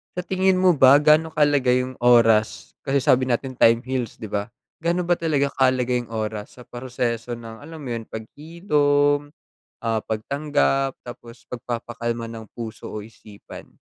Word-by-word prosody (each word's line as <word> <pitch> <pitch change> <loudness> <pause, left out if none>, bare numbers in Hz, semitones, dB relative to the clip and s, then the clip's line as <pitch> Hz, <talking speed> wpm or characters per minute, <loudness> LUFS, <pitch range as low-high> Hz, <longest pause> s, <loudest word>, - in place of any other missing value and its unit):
sa 180 - -3
tingin 190 +1 +1
mo 185 0 +5
ba 135 0 +7
gaano 155 +2 +4
kahalaga 145 -4 +3
yong 125 +1 0
oras, 115 -3 +3
kasi 140 0 +1
sabi 130 0 +4
natin 130 +1 -2
time 115 0 +5
heals 130 -3 -3
'di 110 - -6
ba? 100 0 -2 0.4
Ga'no 175 +2 +1
ba 175 - +3
talaga 150 -4 +1
kahalaga 130 -2 +2
yong 120 -2 -3
oras 110 -1 -4
sa - - -10
proseso 120 -1 -3
ng 115 -1 -10
alam 160 +1 -10
mo 130 - -6
yon 115 - -5
paghilom, 145 - 0 0.5
ah, 115 -1 0
pagtanggap, 135 +3 0
tapos 120 0 -12
pagpapakalma 120 -1 -4
ng 110 -1 -8
puso 115 -2 -7
o 105 - -5
isipan? 105 -2 -13
125 Hz, 155 wpm, -23 LUFS, 115-145 Hz, 0.5 s, ba